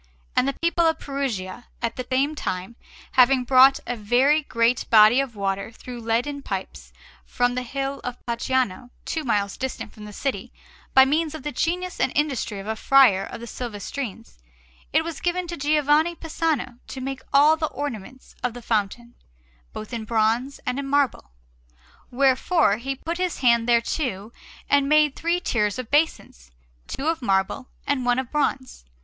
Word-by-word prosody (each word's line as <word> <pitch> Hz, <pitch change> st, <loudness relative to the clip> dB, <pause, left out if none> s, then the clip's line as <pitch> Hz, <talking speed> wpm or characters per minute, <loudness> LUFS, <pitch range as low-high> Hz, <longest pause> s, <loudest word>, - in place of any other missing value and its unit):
And 260 Hz, -, +3 dB
the 275 Hz, -, -2 dB
people 340 Hz, 0 st, +3 dB
of 320 Hz, -1 st, +1 dB
Perugia, 245 Hz, -9 st, -4 dB
at 230 Hz, -1 st, -2 dB
the 255 Hz, -1 st, -6 dB
same 275 Hz, +4 st, +2 dB
time, 190 Hz, -6 st, -4 dB, 0.4 s
having 255 Hz, 0 st, +4 dB
brought 260 Hz, +2 st, +6 dB
a 245 Hz, -, -3 dB
very 250 Hz, +8 st, +3 dB
great 230 Hz, -3 st, 0 dB
body 220 Hz, +3 st, +7 dB
of 270 Hz, -4 st, -2 dB
water 195 Hz, 0 st, -2 dB
through 245 Hz, +1 st, -9 dB
leaden 240 Hz, +6 st, -1 dB
pipes 65 Hz, -, -6 dB, 0.3 s
from 245 Hz, -, 0 dB
the 255 Hz, -, -2 dB
hill 275 Hz, +2 st, -4 dB
of 250 Hz, 0 st, -5 dB
Pacciano, 245 Hz, -1 st, -1 dB, 0.2 s
two 320 Hz, -, -3 dB
miles 205 Hz, -6 st, -1 dB
distant 260 Hz, -4 st, -5 dB
from 210 Hz, -, -11 dB
the 210 Hz, -, -9 dB
city, 270 Hz, +6 st, -4 dB, 0.4 s
by 265 Hz, 0 st, +9 dB
means 310 Hz, +3 st, 0 dB
of 305 Hz, -, -8 dB
the 295 Hz, -, -3 dB
genius 355 Hz, +6 st, -2 dB
and -, -, +1 dB
industry 275 Hz, -8 st, -1 dB
of 195 Hz, -, -7 dB
a 220 Hz, +1 st, -2 dB
friar 230 Hz, -5 st, +5 dB
of -, -, -9 dB
the -, -, -6 dB
Silvestrines, 225 Hz, -, -6 dB, 0.5 s
it 315 Hz, +2 st, +3 dB
was 330 Hz, -3 st, -6 dB
given 355 Hz, +1 st, -1 dB
to 345 Hz, 0 st, -5 dB
Giovanni 300 Hz, +2 st, +2 dB
Pisano 310 Hz, -7 st, -2 dB
to 265 Hz, -, -7 dB
make 265 Hz, 0 st, -5 dB
all 295 Hz, +3 st, +6 dB
the 315 Hz, -1 st, -1 dB
ornaments 260 Hz, -3 st, -7 dB
of 245 Hz, -1 st, -2 dB
the 245 Hz, -, -9 dB
fountain, 225 Hz, +2 st, -2 dB, 0.6 s
both 215 Hz, +3 st, -8 dB
in 225 Hz, -2 st, -4 dB
bronze 230 Hz, +4 st, 0 dB
and 250 Hz, +2 st, -1 dB
in 280 Hz, -, -4 dB
marble; 275 Hz, -, 0 dB, 0.8 s
wherefore 265 Hz, -, +2 dB
he 270 Hz, +4 st, -4 dB
put 335 Hz, +6 st, -5 dB
his 365 Hz, -6 st, -2 dB
hand 235 Hz, -2 st, +3 dB
thereto 235 Hz, -3 st, 0 dB, 0.4 s
and 280 Hz, -1 st, +3 dB
made 300 Hz, -2 st, +4 dB
three 340 Hz, +2 st, 0 dB
tiers 210 Hz, -, 0 dB
of 255 Hz, -3 st, -6 dB
basins, 290 Hz, -, 0 dB, 0.4 s
two 275 Hz, -, -4 dB
of 325 Hz, -2 st, 0 dB
marble 195 Hz, +4 st, 0 dB, 0.2 s
and 280 Hz, -3 st, 0 dB
one 245 Hz, 0 st, +2 dB
of 260 Hz, -2 st, -3 dB
bronze. 270 Hz, -, -2 dB
255 Hz, 170 wpm, -24 LUFS, 230-290 Hz, 0.8 s, by